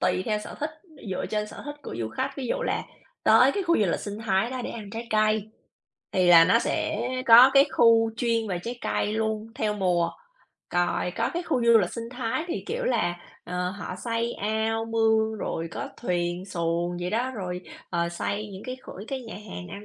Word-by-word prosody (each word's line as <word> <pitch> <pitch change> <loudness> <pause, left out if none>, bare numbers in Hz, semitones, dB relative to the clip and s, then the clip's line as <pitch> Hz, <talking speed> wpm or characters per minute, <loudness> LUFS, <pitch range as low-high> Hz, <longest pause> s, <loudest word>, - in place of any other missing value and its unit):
tùy 185 0 +1
theo 215 -1 +1
sở 210 - -8
thích 300 +2 -1 0.4
dựa 185 - -2
trên 210 -1 -1
sở - - -10
thích 290 0 -6
của - - -7
du 110 -2 -2
khách. 110 - -2
Ví 265 -3 -4
dụ - - -1
là - - -1 0.4
tới - - +6
cái 400 - -1
khu 340 -1 +3
du 210 - +3
lịch - - -1
sinh 205 +1 -6
thái 195 +4 +2
đó 255 -1 -4
để - - -4
ăn 210 -3 -8
trái 230 +1 -6
cây, 215 0 +2 0.6
thì 185 -1 +2
là 165 -1 +9
nó 230 +6 +5
sẽ 235 +2 -1 0.2
có 240 +3 +10
cái 275 +1 +7
khu 225 -1 +5
chuyên 230 -2 +1
về 180 -3 -2
trái 240 +1 -5
cây 210 - -1
luôn 220 0 -1
theo 210 -1 0
mùa, 180 -4 +1 0.7
rồi 175 0 +1
có 230 - 0
cái 350 - -1
khu 255 -8 0
du 235 -1 +7
lịch 180 -4 0
sinh 230 -1 -5
thái 250 +4 -2
thì, 345 - -3
kiểu 485 +2 -2
là, 175 - +1 0.3
ờ, 180 0 -2
họ 200 -1 -6
xây 230 0 -1
ao, 220 +2 -1
mương, 220 -1 +2
rồi 165 -3 -3
có 280 - -5
thuyền 175 -3 -2
xuồng 170 -1 -1
vậy 175 +1 -2
đó, 245 +5 0
rồi, 180 -3 -4 0.3
ờ, 170 0 0
xây 200 +5 -3
những 190 - -8
cái 255 0 -5
kh - - -9 0.2
cái 270 -1 -3
nhà 230 -3 -9
hàng 190 -3 -8
ăn 200 +1 -8
220 Hz, 220 wpm, -26 LUFS, 185-235 Hz, 0.7 s, có